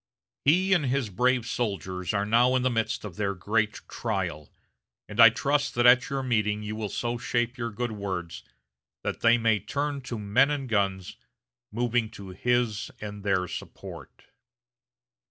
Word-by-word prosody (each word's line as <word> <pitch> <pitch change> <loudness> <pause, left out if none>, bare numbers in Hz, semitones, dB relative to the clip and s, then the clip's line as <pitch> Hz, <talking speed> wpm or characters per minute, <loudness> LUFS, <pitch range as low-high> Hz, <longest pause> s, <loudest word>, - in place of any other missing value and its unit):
He 185 +6 +4
and 160 -7 +2
his 125 -4 -1
brave 125 +3 +2
soldiers 95 -7 -3
are 100 -1 0
now 120 +4 +4
in 125 - +1
the 130 - +2
midst 115 0 -1
of 95 -5 -8
their 100 -2 -1
great 105 +3 0
trial, 90 -10 -3 0.6
and 105 +2 -8
I 115 -1 +11
trust 140 +5 0
that 120 0 +2
at 125 +1 +6
your 135 -1 -2
meeting 105 -4 0
you 105 +1 -4
will 110 -2 -3
so 120 +3 -2
shape 120 -1 -1
your 115 -2 -3
good 120 +2 -3
words 95 -5 -5 0.6
that - - -3
they 115 0 +5
may 115 -2 +2
turn 145 +2 -3
to 120 - -3
men 110 +7 +3
and 145 -3 -2
guns, 100 -5 -1 0.5
moving 120 0 0
to 100 -1 -9
his 115 +2 0
and 105 -1 -7
their 95 -3 +1
support." - - -9
115 Hz, 165 wpm, -27 LUFS, 100-125 Hz, 0.6 s, I